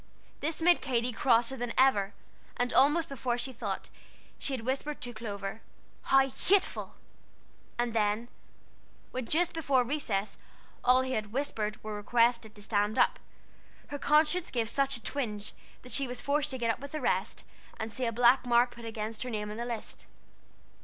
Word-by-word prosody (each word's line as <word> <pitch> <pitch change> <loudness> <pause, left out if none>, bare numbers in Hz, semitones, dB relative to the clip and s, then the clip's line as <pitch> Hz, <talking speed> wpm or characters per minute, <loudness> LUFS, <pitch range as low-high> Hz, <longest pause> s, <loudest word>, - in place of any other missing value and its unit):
This 320 +2 -2
made 350 +1 +5
Katy 245 -2 0
crosser 240 +1 +3
than 245 -2 -3
ever; 210 -7 +4 0.4
and 245 0 0
almost 300 +5 +4
before 250 -4 -2
she 260 +2 -3
thought, 235 - -4 0.5
she - - -2
had 250 -4 -3
whispered 275 +3 -2
to 245 -1 -5
Clover, 205 -1 -5 0.4
"How 270 0 +5
hateful!" 380 +8 +1 0.8
And 240 -1 0
then, 215 +1 +1 0.8
when 255 -2 -4
just 350 +2 +2
before 280 -6 +2
recess 230 -7 -2 0.5
all 255 +1 +5
who 260 - -3
had 215 -2 -1
"communicated" 215 -2 -3
were 215 0 -5
requested 230 +1 +1
to 205 - -12
stand 205 0 0
up, - - +3 0.7
her 285 - -5
conscience 305 +5 +3
gave 230 -3 -1
such 275 0 +1
a 230 - -13
twinge 215 -7 -3 0.3
that 250 - -10
she 275 -1 +1
was 245 0 -5
forced 295 +1 0
to 260 - -4
get 230 -2 +1
up 225 - -5
with 280 +2 -9
the 310 - -2
rest, - - -1 0.4
and 220 0 -4
see 255 - -2
a - - 0
black 245 +3 +5
mark 240 0 +4
put 235 -1 -10
against 220 -1 -4
her 255 - -3
name 210 -2 -3
on 210 - -6
the 235 - -3
list. 235 -2 -6
245 Hz, 175 wpm, -30 LUFS, 225-275 Hz, 0.8 s, made